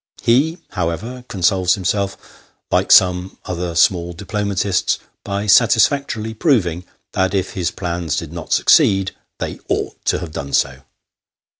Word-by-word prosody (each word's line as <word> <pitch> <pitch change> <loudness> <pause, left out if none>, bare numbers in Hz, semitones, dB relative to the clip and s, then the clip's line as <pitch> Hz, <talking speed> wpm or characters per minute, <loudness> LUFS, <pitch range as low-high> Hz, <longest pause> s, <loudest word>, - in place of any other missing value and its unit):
He 140 +8 +2
however 105 +8 -4
consoles 95 -1 +2
himself, 100 +1 -1 0.5
like - - +1
some 90 0 +4
other 90 -1 -4
small 85 0 +2
diplomatists, 100 +1 -1 0.3
by 100 +1 -3
satisfactorily 115 +1 +3
proving 95 - +1 0.3
that 95 +1 0
if 95 -1 -1
his 90 -3 -1
plans 85 -5 -3
did 85 -1 -5
not 85 -2 -8
succeed, 95 -1 +4 0.3
they - - -5
ought - - -3
to - - +2
have 85 -3 -6
done 70 -2 -6
so. 65 0 +1
95 Hz, 130 wpm, -19 LUFS, 85-105 Hz, 0.5 s, some